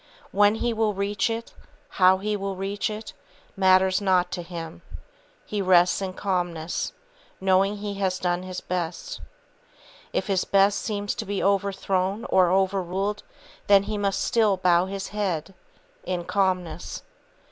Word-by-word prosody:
When 205 Hz, +1 st, +4 dB
he 235 Hz, +1 st, -1 dB
will 220 Hz, -2 st, 0 dB
reach 200 Hz, +3 st, 0 dB
it, 230 Hz, +1 st, -4 dB, 0.5 s
how 185 Hz, +1 st, +7 dB
he 210 Hz, +2 st, -2 dB
will 195 Hz, -1 st, -3 dB
reach 195 Hz, +3 st, -2 dB
it, 215 Hz, +1 st, -7 dB, 0.4 s
matters 190 Hz, 0 st, +4 dB
not 185 Hz, -2 st, +2 dB
to 175 Hz, -, -3 dB
him. 165 Hz, -2 st, -8 dB, 0.6 s
He 210 Hz, -1 st, -2 dB
rests 180 Hz, 0 st, +4 dB
in 190 Hz, -1 st, -3 dB
calmness, 175 Hz, -4 st, -2 dB, 0.5 s
knowing 195 Hz, +2 st, +2 dB
he 205 Hz, 0 st, -4 dB
has 185 Hz, -2 st, 0 dB
done 180 Hz, -1 st, -1 dB
his 185 Hz, 0 st, -6 dB
best. 175 Hz, -2 st, -4 dB, 0.9 s
If -, -, -1 dB
his 195 Hz, -2 st, +1 dB
best 200 Hz, +1 st, +3 dB
seem 205 Hz, -2 st, -3 dB
to 220 Hz, +3 st, -2 dB
be 200 Hz, -2 st, -3 dB
overthrown 195 Hz, +1 st, 0 dB
or 185 Hz, -2 st, +5 dB
overruled, 195 Hz, +2 st, 0 dB, 0.5 s
then 200 Hz, -1 st, +6 dB
he 215 Hz, -, -4 dB
must 200 Hz, -1 st, 0 dB
still 215 Hz, -4 st, +2 dB
bow 180 Hz, 0 st, +3 dB
his 195 Hz, 0 st, -5 dB
head, 195 Hz, -4 st, -2 dB, 0.5 s
in 180 Hz, -1 st, -3 dB
calmness. 180 Hz, -4 st, -1 dB
195 Hz, 145 wpm, -25 LUFS, 185-205 Hz, 0.9 s, how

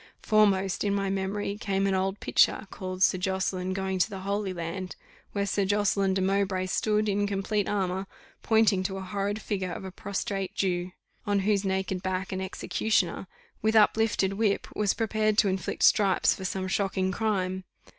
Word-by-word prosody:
Foremost 195 Hz, -3 st, +3 dB
in 200 Hz, -1 st, +1 dB
my 195 Hz, -1 st, -1 dB
memory 195 Hz, +1 st, -2 dB
came 195 Hz, -3 st, 0 dB
an 195 Hz, -, +1 dB
old 190 Hz, +1 st, -1 dB
picture, -, -, +3 dB
called 185 Hz, 0 st, -3 dB
"Sir 185 Hz, -, +4 dB
Josseline 185 Hz, 0 st, -1 dB
going 190 Hz, 0 st, -2 dB
to 180 Hz, -, +2 dB
the 195 Hz, -3 st, -7 dB
Holy 200 Hz, 0 st, -2 dB
Land," 180 Hz, +1 st, -5 dB, 0.4 s
where 200 Hz, -1 st, 0 dB
Sir 200 Hz, 0 st, 0 dB
Josseline 200 Hz, -1 st, +1 dB
de 190 Hz, -, +1 dB
Mowbray 190 Hz, -1 st, +1 dB
stood, 210 Hz, +3 st, +1 dB
in 205 Hz, 0 st, +1 dB
complete 200 Hz, +1 st, -1 dB
armour, 190 Hz, -1 st, -1 dB, 0.3 s
pointing 220 Hz, -4 st, +3 dB
to 190 Hz, 0 st, -3 dB
a -, -, -5 dB
horrid 200 Hz, +2 st, -2 dB
figure 190 Hz, -4 st, -3 dB
of 185 Hz, -, -6 dB
a 190 Hz, -, -6 dB
prostrate 195 Hz, 0 st, -4 dB
Jew, 180 Hz, -1 st, -1 dB, 0.4 s
on 200 Hz, -1 st, +2 dB
whose 200 Hz, 0 st, +1 dB
naked 190 Hz, -1 st, -1 dB
back 185 Hz, 0 st, -2 dB
an 190 Hz, 0 st, -3 dB
executioner, 190 Hz, 0 st, -1 dB, 0.3 s
with 220 Hz, +1 st, +1 dB
uplifted 215 Hz, -2 st, +3 dB
whip, 205 Hz, -1 st, +1 dB
was 210 Hz, -2 st, +1 dB
prepared 215 Hz, -2 st, 0 dB
to 205 Hz, -, +5 dB
inflict 185 Hz, -2 st, -2 dB
stripes 195 Hz, -3 st, +4 dB
for 190 Hz, -, -7 dB
some 185 Hz, 0 st, -2 dB
shocking 190 Hz, -1 st, 0 dB
crime. 190 Hz, -3 st, -1 dB
195 Hz, 175 wpm, -27 LUFS, 190-205 Hz, 0.4 s, to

